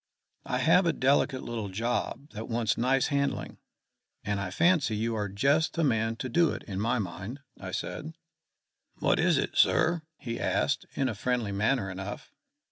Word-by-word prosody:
"I 125 - 0
have 165 +7 +4
a 165 - +3
delicate 135 0 +2
little 115 -4 -4
job 120 +7 -2
that 110 +1 -7
wants 115 -2 +1
nice 130 +3 +2
handling, 140 -2 -1 0.6
and 100 -1 -1
I 100 - -3
fancy 165 -9 +3
you 115 +2 -1
are 105 -2 -2
just 140 +11 +2
the 165 - +1
man 115 -4 +1
to 130 - -4
do 165 +7 +3
it - - -7
to 100 - -6
my 115 +5 +1
mind," 100 +6 -5 0.2
I 95 - -6
said. 155 - -5 0.8
"What - - +1
is - - +4
it, - - -1
sir?" 165 +1 +4 0.2
he 115 -3 -5
asked, - - 0
in 135 - +1
a 120 - -1
friendly 120 0 -1
manner 110 +2 +1
enough. 95 +2 -7
120 Hz, 175 wpm, -29 LUFS, 105-140 Hz, 0.8 s, have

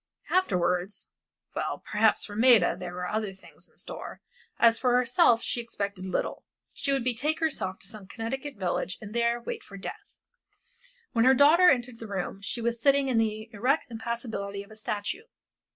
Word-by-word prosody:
Afterwards 180 - 0 0.5
well, - - -3
perhaps 215 +1 +3
for 205 - -8
Maida 230 -5 +5
there 180 0 -7
were 180 0 -3
other 215 -2 -2
things 190 - -15
in - - -27
store, - - -7 0.4
as 230 -1 +5
for 250 -1 +3
herself 245 -1 +4
she 240 - -1
expected 200 -4 -4
little. 185 - -2 0.3
She 280 - -2
would 270 -2 +1
betake 255 +6 0
herself 190 - -1
to 195 - -9
some 210 -2 -9
Connecticut 265 +7 -5
village 185 -1 -2
and 210 -2 -9
there 235 0 +1
wait 235 - -5
for 200 - -11
death. 195 - -9 0.9
When 230 -1 +3
her 260 +1 +7
daughter 320 +7 +7
entered 245 -3 0
the 225 - -7
room 195 -1 -4
she 215 +4 -3
was 235 0 -1
sitting 275 0 +4
in 240 -3 +3
the 220 0 -1
erect 255 +6 0
impassibility 225 -3 -4
of 200 - -18
a - - -11
statue. 215 - -3
230 Hz, 175 wpm, -28 LUFS, 200-250 Hz, 0.9 s, her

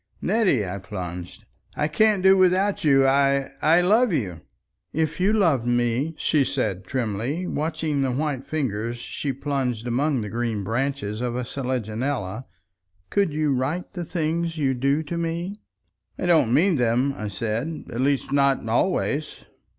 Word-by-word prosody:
"Nettie," 185 - +2
I 95 +2 -4
plunged, 90 -2 -7 0.3
"I 150 - +1
can't 205 +5 +2
do 190 0 +7
without 190 +2 +2
you. 135 -3 +5
I—I 140 +4 +3
love 215 +6 +4
you." 90 - -2 0.5
"If 160 +1 -1
you 190 +3 +3
loved 165 - +2
me," 120 +6 +1
she 150 -3 +2
said 110 -8 -2
trimly, 125 - -2
watching 155 -3 -1
the 135 - +1
white 140 0 -2
fingers 120 -6 -2
she 140 +3 -4
plunged 130 -4 -2
among 130 +2 +1
the 105 - -5
green 115 -3 -2
branches 115 -1 -2
of 120 -1 -2
a 125 - -2
selaginella, 125 -2 -3 0.7
"could 200 -5 +2
you 150 -1 +1
write 140 +8 -2
the 175 - -4
things 165 0 -2
you 135 -3 +1
do 140 +4 +1
to 170 +3 -4
me?" 170 +3 -2 0.6
"I - - -3
don't 160 -9 +4
mean 165 +6 +4
them," 125 +3 +2
I 105 - -5
said. 115 - -3
"At 120 - -2
least 135 0 0
not 140 -4 +2
always." 150 +4 0
140 Hz, 150 wpm, -24 LUFS, 120-160 Hz, 0.7 s, do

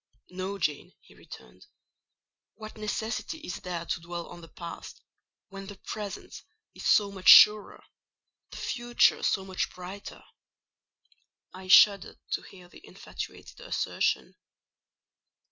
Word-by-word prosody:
"No, 190 +2 -5
Jane," 150 -5 -3
he - - -21
returned: 60 - -15 0.9
"what 215 0 -10
necessity 220 +7 -4
is 185 - -6
there 175 -2 -5
to 165 - -3
dwell 170 0 -6
on 175 - -11
the 165 - -12
Past, 170 0 -10 0.5
when 195 0 -9
the 205 - -9
Present 205 +1 -8 0.3
is - - -6
so 205 -1 +4
much 190 -2 +1
surer—the 210 0 +4
Future 240 -2 +1
so 190 - 0
much 190 -1 -3
brighter?" 185 +3 -10 1.3
I 185 0 -11
shuddered 200 +1 +5
to - - -1
hear 180 -2 -15
the - - -17
infatuated - - -10
assertion. - - -2
195 Hz, 120 wpm, -28 LUFS, 180-210 Hz, 1.3 s, shuddered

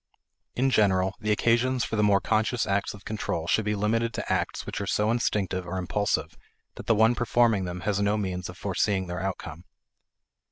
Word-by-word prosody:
In 135 +2 +2
general, 95 -4 +3
the 105 -1 -1
occasion 120 +4 +2
for 115 - -1
the 105 - +2
more 100 -1 +4
conscious 110 +2 0
acts 100 +1 -1
of 100 - -16
control 100 -6 -3
should 105 +5 +1
be 105 0 0
limited 115 +2 0
to - - -2
acts - - -2
which - - -4
are - - -4
so 105 +1 +1
instinctive 95 -6 -1
or 90 +2 -3
impulsive 100 +3 -1 0.4
that - - -10
the 115 - +4
one 110 +2 +5
performing 120 -4 +2
them 90 0 -5
has 100 +2 0
no 100 +1 +2
means 90 -3 -3
of 90 - -10
foreseeing 95 0 0
their 90 +1 -5
outcome. 95 0 -5
105 Hz, 195 wpm, -27 LUFS, 95-115 Hz, 0.4 s, one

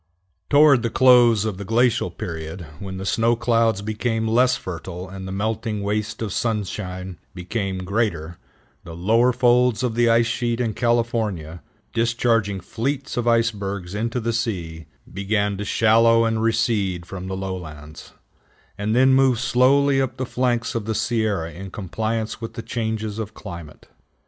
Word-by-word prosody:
Toward 145 -3 +6
the 115 - -1
close 120 -4 +5
of 105 -3 -3
the - - -4
glacial 115 0 +2
period, 85 +1 -6
when 95 -1 -6
the 95 - -5
snow 115 +4 +2
clouds 115 -3 +1
became 110 +1 -1
less 125 +3 +3
fertile 90 0 -7
and 95 0 -8
the - - -5
melting 110 +1 -2
waste 105 +2 -2
of 105 - -3
sunshine 95 -5 -3 0.2
became 95 0 -3
greater, 90 -5 -2 0.4
the 85 - -9
lower 115 +8 +3
folds 125 -1 +3
of 125 -3 0
the 120 0 +3
ice 115 0 +4
sheet 120 0 -1
in 115 -3 -1
California, 110 -9 -1 0.3
discharging 115 -4 +1
fleets 140 +9 -3
of 120 -1 -1
icebergs 100 -6 0
into 115 +4 -2
the 115 0 -2
sea, 85 -9 -3 0.3
began 100 +1 0
to 105 - -4
shallow 115 +2 +4
and 115 -1 0
recede 110 -6 0
from 90 0 -7
the 95 0 -4
lowlands, 80 -6 -7 0.7
and 105 +2 0
then 130 +1 +5
move 130 -3 +4
slowly 135 +2 +3
up 130 -1 -3
the 130 - -2
flanks 125 -1 -1
of 115 -4 -3
the 110 0 -2
Sierra 105 -9 -1
in 95 +3 -8
compliance 110 +5 -3
with 115 - -6
the 115 - -6
changes 110 -2 -3
of 110 -1 -5
climate. 85 -7 -10
110 Hz, 155 wpm, -22 LUFS, 95-120 Hz, 0.7 s, Toward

